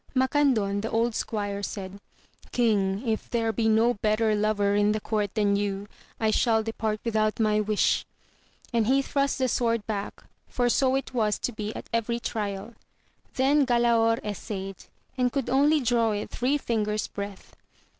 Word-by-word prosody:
Macandon, 255 Hz, -7 st, +2 dB
the 225 Hz, -, -3 dB
old 230 Hz, +1 st, +1 dB
squire, 205 Hz, -2 st, -3 dB
said, 195 Hz, -1 st, -6 dB, 0.5 s
King, 210 Hz, -2 st, +1 dB
if 220 Hz, -1 st, -2 dB
there 225 Hz, -2 st, 0 dB
be 220 Hz, +1 st, +1 dB
no 225 Hz, +2 st, +4 dB
better 215 Hz, 0 st, +2 dB
lover 205 Hz, -1 st, +1 dB
in 205 Hz, +1 st, +3 dB
the 215 Hz, -, -1 dB
court 210 Hz, -1 st, -2 dB
than 205 Hz, -2 st, +2 dB
you, 200 Hz, -1 st, -2 dB, 0.3 s
I 220 Hz, -1 st, +2 dB
shall 220 Hz, 0 st, +2 dB
depart 220 Hz, -1 st, -2 dB
without 215 Hz, -2 st, 0 dB
my 215 Hz, -1 st, +2 dB
wish, 215 Hz, 0 st, +1 dB, 0.7 s
and 230 Hz, -2 st, +2 dB
he 270 Hz, +2 st, +3 dB
thrust 280 Hz, 0 st, 0 dB
the 260 Hz, -1 st, +1 dB
sword 230 Hz, -3 st, 0 dB
back, 205 Hz, -2 st, -5 dB, 0.3 s
for 245 Hz, -1 st, +1 dB
so 260 Hz, +1 st, +2 dB
it 270 Hz, -1 st, -3 dB
was 215 Hz, -4 st, +1 dB
to -, -, -2 dB
be 215 Hz, -2 st, -4 dB
at -, -, -7 dB
every 230 Hz, +1 st, 0 dB
trial; 210 Hz, -1 st, -4 dB, 0.6 s
then 280 Hz, +3 st, +3 dB
Galaor 235 Hz, -2 st, +3 dB
essayed, 195 Hz, -2 st, -5 dB, 0.3 s
and 250 Hz, -1 st, +2 dB
could 265 Hz, -2 st, -2 dB
only 290 Hz, +4 st, +4 dB
draw 230 Hz, -3 st, +2 dB
it 205 Hz, -, -4 dB
three 260 Hz, +4 st, +1 dB
fingers' 215 Hz, -5 st, -1 dB
breadth. 200 Hz, -1 st, -8 dB
220 Hz, 165 wpm, -26 LUFS, 210-240 Hz, 0.7 s, no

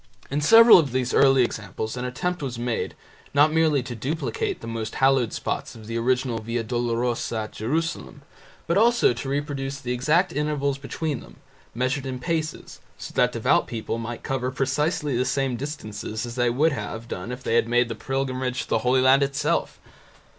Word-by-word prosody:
In 145 Hz, +2 st, 0 dB
several 225 Hz, +7 st, +9 dB
of 140 Hz, -6 st, -1 dB
these 130 Hz, -1 st, 0 dB
early 135 Hz, -2 st, +5 dB
examples 110 Hz, 0 st, -4 dB
an 125 Hz, 0 st, -4 dB
attempt 175 Hz, +8 st, -3 dB
was 130 Hz, -4 st, -4 dB
made, 120 Hz, -1 st, -2 dB, 0.4 s
not 150 Hz, +2 st, +5 dB
merely 155 Hz, -4 st, +3 dB
to 125 Hz, -1 st, -6 dB
duplicate 130 Hz, +1 st, -3 dB
the -, -, -10 dB
most 115 Hz, -1 st, -4 dB
hallowed 135 Hz, -3 st, +3 dB
spots -, -, -4 dB
of 110 Hz, -1 st, -12 dB
the 115 Hz, +1 st, -5 dB
original 125 Hz, 0 st, 0 dB
Via 115 Hz, +1 st, -3 dB
Dolorosa 120 Hz, -1 st, -1 dB
at 110 Hz, -, -6 dB
Jerusalem, 150 Hz, +4 st, -3 dB, 0.4 s
but 170 Hz, +4 st, +2 dB
also 235 Hz, -, +4 dB
to 120 Hz, +3 st, -5 dB
reproduce 140 Hz, -1 st, -3 dB
the 125 Hz, -2 st, -4 dB
exact 155 Hz, +9 st, +2 dB
intervals 140 Hz, -1 st, -1 dB
between 145 Hz, 0 st, -3 dB
them, -, -, -14 dB, 0.4 s
measured 130 Hz, +3 st, -1 dB
in 130 Hz, -1 st, -4 dB
paces, 155 Hz, +4 st, -3 dB, 0.2 s
so -, -, -8 dB
that -, -, +3 dB
devout -, -, +2 dB
people 115 Hz, 0 st, -4 dB
might 115 Hz, +1 st, -6 dB
cover 130 Hz, -1 st, -1 dB
precisely 145 Hz, +2 st, -1 dB
the 125 Hz, -, +2 dB
same 135 Hz, -1 st, 0 dB
distances 110 Hz, -5 st, -5 dB
as 120 Hz, -, -6 dB
they 120 Hz, 0 st, +1 dB
would 145 Hz, +7 st, +2 dB
have 110 Hz, -1 st, -5 dB
done 90 Hz, 0 st, -6 dB
had 125 Hz, +1 st, -6 dB
they 120 Hz, -1 st, +3 dB
made 120 Hz, +1 st, +1 dB
the 115 Hz, -, -4 dB
pilgrimage 130 Hz, +1 st, -2 dB
to -, -, -15 dB
the -, -, +2 dB
Holy 125 Hz, +3 st, +2 dB
Land 130 Hz, +2 st, +5 dB
itself. 140 Hz, +2 st, 0 dB
130 Hz, 180 wpm, -24 LUFS, 120-145 Hz, 0.4 s, several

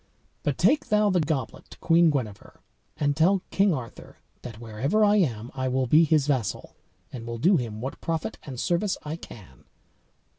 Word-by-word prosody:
But 145 Hz, -3 st, -2 dB
take 250 Hz, -, +2 dB
thou 210 Hz, -1 st, +3 dB
the 180 Hz, -, +2 dB
goblet 150 Hz, -6 st, -3 dB
to -, -, -13 dB
Queen 170 Hz, 0 st, +4 dB
Guenever, 115 Hz, -9 st, -4 dB, 0.4 s
and 145 Hz, -1 st, 0 dB
tell 185 Hz, +5 st, +3 dB
King 200 Hz, 0 st, +3 dB
Arthur 125 Hz, -8 st, -7 dB, 0.2 s
that, 115 Hz, -3 st, -9 dB
wherever 125 Hz, -, 0 dB
I 205 Hz, 0 st, +4 dB
am, 120 Hz, -, -1 dB
I 130 Hz, 0 st, -2 dB
will 130 Hz, 0 st, 0 dB
be 155 Hz, +7 st, +5 dB
his 155 Hz, -2 st, +2 dB
vassal, 130 Hz, -8 st, -2 dB, 0.4 s
and 115 Hz, -3 st, -7 dB
will 115 Hz, 0 st, -4 dB
do 180 Hz, -, +4 dB
him 110 Hz, -5 st, -5 dB
what 130 Hz, +2 st, -6 dB
profit 165 Hz, -1 st, -3 dB
and 130 Hz, -4 st, -8 dB
service 180 Hz, +6 st, 0 dB
I 150 Hz, +1 st, -4 dB
can." 95 Hz, -, -13 dB
145 Hz, 180 wpm, -26 LUFS, 120-170 Hz, 0.4 s, be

